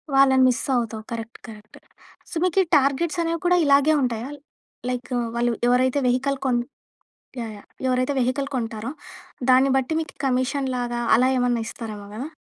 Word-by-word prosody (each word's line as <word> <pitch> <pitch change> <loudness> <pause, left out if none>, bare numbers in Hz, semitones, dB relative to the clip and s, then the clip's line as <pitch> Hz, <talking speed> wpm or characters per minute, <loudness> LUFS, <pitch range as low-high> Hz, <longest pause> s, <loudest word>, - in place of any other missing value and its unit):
వాళ్ళని 265 -1 +5
miss 245 - -1
అవుతావ్. 225 -2 -2
Correct 230 0 -6
correct. 215 -1 -13 0.5
So, - - -9
మీకు 365 +1 +2
ఈ - - -8
టార్గెట్స్ 285 +5 0
అనేవి 335 0 -1
కూడా 360 0 +4
ఇలాగే 285 +2 +5
ఉంటాయా? 240 0 -2 0.6
లైక్ 250 +1 -4 0.2
వాళ్ళు 240 0 +1 0.2
ఎవరైతే 255 +3 +3
వెహికల్ 265 +3 +1
కొన్ 245 -2 +2 0.8
యాహ్! 225 -2 -5
యాహ్! - - -18 0.2
ఎవరైతే 255 +2 +1
వెహికల్ 275 +3 0
కొంటారో, 230 -1 -3 0.6
దాన్ని 260 +2 +5
బట్టి 270 +4 0
మీకు 315 -3 -7
కమీషన్ 265 +1 0
లాగా, 240 -1 -2 0.2
అలా 255 +3 +3
ఏమన్నా 245 -2 +1
ఇస్తారేమో 215 -6 -7
కదా! 255 +7 -5
255 Hz, 155 wpm, -23 LUFS, 240-275 Hz, 0.8 s, వాళ్ళని